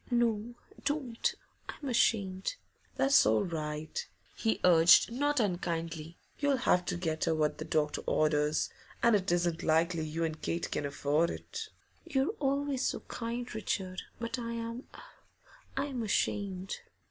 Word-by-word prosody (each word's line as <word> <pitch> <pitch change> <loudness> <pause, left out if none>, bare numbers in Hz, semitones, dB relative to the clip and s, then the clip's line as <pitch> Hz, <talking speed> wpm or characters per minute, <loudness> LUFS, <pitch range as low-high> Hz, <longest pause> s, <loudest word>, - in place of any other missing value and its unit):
'No 235 -1 +1 0.3
don't 270 -6 -1 0.3
I'm 285 - -6
ashamed.' 205 - +1 0.4
'That's 275 +1 +5
all 110 0 +3
right,' 155 -2 -4 0.3
he 225 - 0
urged, 170 +3 +7
not 290 +3 +1
unkindly. 170 -5 -2 0.2
'You'll 285 -2 +2
have 180 0 +4
to 180 - -1
get 160 -3 -1
her 165 -1 +2
what 155 -1 0
the - - -4
doctor 150 -1 0
orders, 150 0 +2 0.3
and 235 -2 +6
it 190 -3 +1
isn't 175 -1 +1
likely 165 +1 +2
you 165 +2 -2
and 160 -1 -2
Kate 170 0 -2
can 145 - -1
afford 145 +4 +1
it.' 450 -2 -6 0.3
'You're 285 +2 0
always 280 -1 0
so - - -2
kind, 240 +1 -5
Richard. 190 -3 -2 0.2
But 230 +2 -3
I 235 -1 -3
am 230 +2 -5 0.9
I 275 - +1
am 265 -4 -4
ashamed! 200 -3 -1
190 Hz, 145 wpm, -31 LUFS, 165-240 Hz, 0.9 s, urged